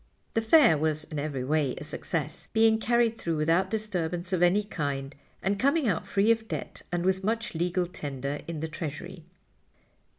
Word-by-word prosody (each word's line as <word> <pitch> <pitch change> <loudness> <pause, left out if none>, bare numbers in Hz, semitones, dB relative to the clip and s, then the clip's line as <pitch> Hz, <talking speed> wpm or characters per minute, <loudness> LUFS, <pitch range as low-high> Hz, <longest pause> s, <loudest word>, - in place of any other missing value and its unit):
The 225 - +2
Fair 225 - +6
was 155 0 0
in 155 -1 -5
every 140 -3 -3
way 145 -1 +1
a - - -6
success, 155 +1 -4
being 220 0 +4
carried 235 0 +2
through 165 -2 -1
without 165 +5 +2
disturbance 180 -4 -2
of 180 - +1
any 180 +4 +4
kind 140 -7 -3 0.3
and 195 +2 0
coming 280 +2 +2
out 180 -6 0
free 205 +3 +3
of 225 -1 0
debt - - -5
and 175 0 -1
with 190 0 +1
much 225 +2 -1
legal 175 +2 0
tender 140 -4 -5
in 165 -3 -4
the 160 - -2
treasury. 155 -2 -6
175 Hz, 175 wpm, -28 LUFS, 155-215 Hz, 0.3 s, Fair